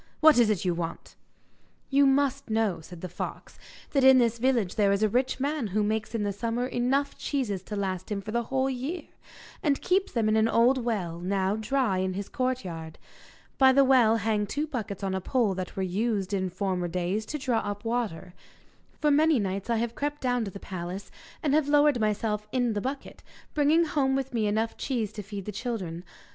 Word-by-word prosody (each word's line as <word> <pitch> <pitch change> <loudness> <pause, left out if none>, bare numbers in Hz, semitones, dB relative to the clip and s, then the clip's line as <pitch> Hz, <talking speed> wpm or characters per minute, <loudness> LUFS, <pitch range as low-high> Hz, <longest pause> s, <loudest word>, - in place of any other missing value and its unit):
What 310 -4 +7
is 230 -3 +5
it 200 -4 0
you 180 - +2
want?' 170 -1 -5 0.8
'You 280 +1 +5
must 275 -1 +1
know,' 215 -6 0
said 170 +1 -11
the 185 - -4
fox, 175 - -7 0.3
'that 275 -2 +2
in 265 0 +8
this 235 -2 +2
village 235 -7 +1
there 205 -3 +3
is 200 +2 +1
a - - +5
rich 255 +5 0
man 285 -3 -1
who 210 +2 0
makes 215 +2 -2
in 220 - 0
the 205 -1 -1
summer 230 +4 -2
enough 265 +3 0
cheeses 235 -10 -2
to 210 - -5
last 190 -2 -3
him 205 - -1
for 205 +2 -7
the 235 +1 +1
whole 265 +2 0
year, 270 +7 -3 0.6
and 285 -3 +1
keeps 385 +2 +1
them 230 -3 +1
in 215 - +3
an 220 0 +4
old 240 +3 +3
well, 185 -8 -2
now 190 +2 0
dry, 220 -3 0
in 185 0 -1
his 200 0 -5
courtyard. 185 - -3 0.6
By 265 -1 +7
the 275 +1 +6
well 245 -4 +5
hang 210 -1 0
two 290 +8 -2
buckets 220 -9 -5
on 190 -1 -1
a 190 - -2
pole 225 0 +1
that 185 -1 -5
were 190 - -1
used, 200 +1 -1
in 190 -1 0
former 185 -1 -2
days, 180 +4 -1
to 305 - -3
draw 255 -5 0
up 205 +1 -5
water. 215 -7 -2 0.7
For 300 - +3
many 310 +1 +4
nights 195 0 -2
I 235 - +2
have 230 +1 -1
crept 290 +3 -3
down 245 -2 0
to - - -4
the 195 - -9
palace, 185 +1 -6 0.3
and 290 -3 +1
have 305 -1 +3
lowered 290 -3 +4
myself 210 0 -1
in 245 -2 +1
the 205 - -2
bucket, 270 +4 -5 0.3
bringing 305 +3 +4
home 275 -3 +1
with 270 -1 -2
me 220 -3 +1
enough 220 +2 -1
cheese 235 -6 -2
to 210 - -5
feed 200 -1 -7
the 210 - -4
children. 195 -6 -4
225 Hz, 210 wpm, -27 LUFS, 195-265 Hz, 0.8 s, in